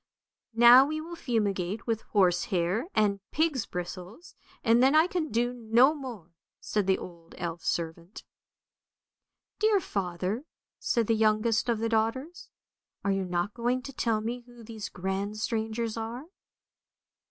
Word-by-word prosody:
" - - -63
Now 240 +3 +8
we 310 +1 -3
will 335 +2 -7
fumigate 210 - -1
with 225 -2 -1
horse 180 -4 +3
hair 190 - 0
and 205 -2 +2
pig's 305 -7 0
bristles, 180 - -7 0.3
and 230 0 +4
then 265 +3 +5
I 315 +1 +6
can 350 -4 -2
do 240 +2 0
no 240 +4 +4
more! 240 - -8 0.2
" - - -65
said 210 -3 -1
the 190 - +3
old 170 -1 -11
elf 170 -2 -4
servant. 170 +3 -4 0.7
" - - -62
Dear 430 -1 +4
father! 190 - -3 0.2
" - - -65
said 235 -1 +1
the 225 - +2
youngest 220 +1 +2
of 235 - +2
the 225 +1 -1
daughters, 230 +9 -2 0.3
" - - -58
are 200 - +2
you 195 -1 0
not 180 +3 -2
going 245 +2 -1
to 275 - -8
tell 225 -4 0
me 235 +3 -3
who 240 -1 -14
these 220 -2 -7
grand 195 +3 -3
strangers 225 0 -2
are? 230 +5 -5
225 Hz, 165 wpm, -28 LUFS, 195-245 Hz, 0.7 s, Now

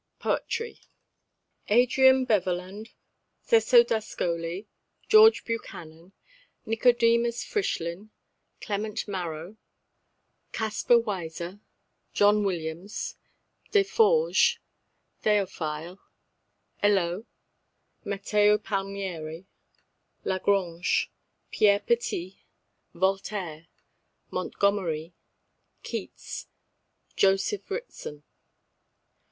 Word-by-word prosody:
POETRY. 460 0 -2 0.9
Adrian 260 +3 +5
Beverland 195 0 -1 0.5
Cecco 470 +1 +6
d'Ascoli 180 - -3 0.4
George 440 +1 +7
Buchanan 175 -6 -7 0.5
Nicodemus 235 +1 +2
Frischlin 195 - -3 0.5
Clement 215 +1 -3
Marot 175 0 -5 1.0
Caspar 220 +2 +2
Weiser 185 -4 -4 0.5
John 205 +1 +4
Williams 175 +1 -4 0.5
Deforges 450 +4 +3 0.6
Théophile 180 -4 -1 0.8
Helot 195 0 +1 0.8
Matteo 205 +1 +2
Palmieri 195 -5 -4 0.8
La 190 -1 0
Grange 180 -3 +1 0.4
Pierre 200 -1 +4
Petit 190 -6 -2 0.5
Voltaire 190 -3 -2 0.6
Montgomery 175 -5 -1 0.7
Keats - - -6 0.7
Joseph 195 - +1
Ritson. 395 - -6
200 Hz, 60 wpm, -27 LUFS, 175-230 Hz, 1.0 s, George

